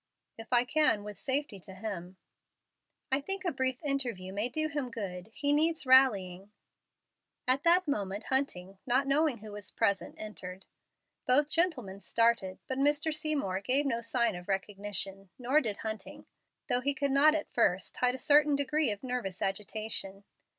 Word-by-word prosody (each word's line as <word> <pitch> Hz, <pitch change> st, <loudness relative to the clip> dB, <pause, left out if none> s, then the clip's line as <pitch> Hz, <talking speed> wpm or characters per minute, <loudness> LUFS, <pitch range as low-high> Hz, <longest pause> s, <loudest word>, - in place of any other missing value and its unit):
"If 225 Hz, +2 st, -11 dB
I 245 Hz, 0 st, +4 dB
can 255 Hz, -7 st, +3 dB
with 210 Hz, -1 st, -8 dB
safety 265 Hz, -6 st, -2 dB
to 190 Hz, +1 st, -12 dB
him." 190 Hz, -3 st, -6 dB, 0.9 s
"I 270 Hz, +2 st, +2 dB
think 385 Hz, +5 st, -4 dB
a 350 Hz, -, +1 dB
brief 260 Hz, 0 st, -2 dB
interview 240 Hz, -10 st, -2 dB
may 210 Hz, +5 st, -1 dB
do 310 Hz, +5 st, 0 dB
him 290 Hz, -4 st, -3 dB
good. 195 Hz, -4 st, -6 dB
He 285 Hz, +5 st, 0 dB
needs 320 Hz, +1 st, +1 dB
rallying." 205 Hz, -8 st, +4 dB, 1.0 s
At 260 Hz, +2 st, +3 dB
that 350 Hz, +1 st, +4 dB
moment 205 Hz, -6 st, -2 dB
Hunting, 195 Hz, -9 st, -2 dB
not 255 Hz, +3 st, +2 dB
knowing 280 Hz, -1 st, +2 dB
who 215 Hz, -1 st, -10 dB
was 205 Hz, -1 st, -4 dB
present, 200 Hz, -4 st, 0 dB
entered. 190 Hz, -3 st, -7 dB, 0.6 s
Both 285 Hz, +4 st, +3 dB
gentleman 275 Hz, -, 0 dB
started, 230 Hz, -6 st, +1 dB
but 260 Hz, 0 st, -3 dB
Mr. 295 Hz, +3 st, +2 dB
Seymour 300 Hz, -, -1 dB
gave 265 Hz, +8 st, +1 dB
no 235 Hz, -4 st, 0 dB
sign 230 Hz, -2 st, +1 dB
of 175 Hz, 0 st, -9 dB
recognition, 195 Hz, 0 st, -3 dB
nor 265 Hz, +4 st, +2 dB
did 215 Hz, -5 st, -3 dB
Hunting, 220 Hz, -1 st, -6 dB, 0.4 s
though 250 Hz, -3 st, +1 dB
he 280 Hz, +2 st, 0 dB
could 280 Hz, 0 st, 0 dB
not 295 Hz, +3 st, +6 dB
at 310 Hz, -, -4 dB
first 190 Hz, -5 st, +1 dB
hide 250 Hz, 0 st, +2 dB
a -, -, -5 dB
certain 290 Hz, +2 st, +4 dB
degree 285 Hz, 0 st, +1 dB
of 205 Hz, +2 st, -4 dB
nervous 245 Hz, -8 st, -3 dB
agitation. 200 Hz, 0 st, -3 dB
240 Hz, 165 wpm, -31 LUFS, 200-285 Hz, 1.0 s, not